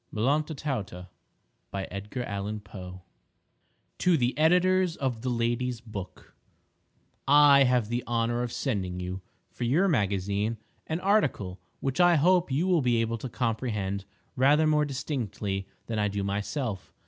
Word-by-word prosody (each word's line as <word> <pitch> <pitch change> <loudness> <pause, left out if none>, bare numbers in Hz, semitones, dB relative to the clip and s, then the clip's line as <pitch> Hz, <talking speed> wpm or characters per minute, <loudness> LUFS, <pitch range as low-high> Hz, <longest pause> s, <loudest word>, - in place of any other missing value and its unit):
] - - -43
MELLONTA 145 +8 0
TAUTA 100 -11 -4 2.9
TO - - -3
THE 125 -2 0
EDITORS 180 +2 +3
OF 125 -5 -2
THE 130 - -2
LADY'S 120 0 -1
BOOK: 105 -5 -9 0.9
I 140 -1 +7
have 125 -3 +2
the 120 0 -1
honor 120 0 0
of 120 -1 -3
sending 95 -10 -2
you, 90 +1 -5 0.3
for - - -6
your 150 +12 +3
magazine, 100 - 0 0.3
an 160 +3 -2
article 145 - +1 0.2
which 135 0 -2
I 175 -1 +6
hope 175 +1 +3
you 145 +7 +1
will 180 -4 +3
be 120 -3 +2
able 115 0 -1
to 130 - -5
comprehend 110 -5 -2 0.3
rather 145 +4 +4
more 150 -1 +3
distinctly 110 -8 -3 0.2
than 110 -2 -3
I 105 - +2
do 100 0 -2
myself. 100 +2 -3
120 Hz, 135 wpm, -28 LUFS, 105-145 Hz, 2.9 s, I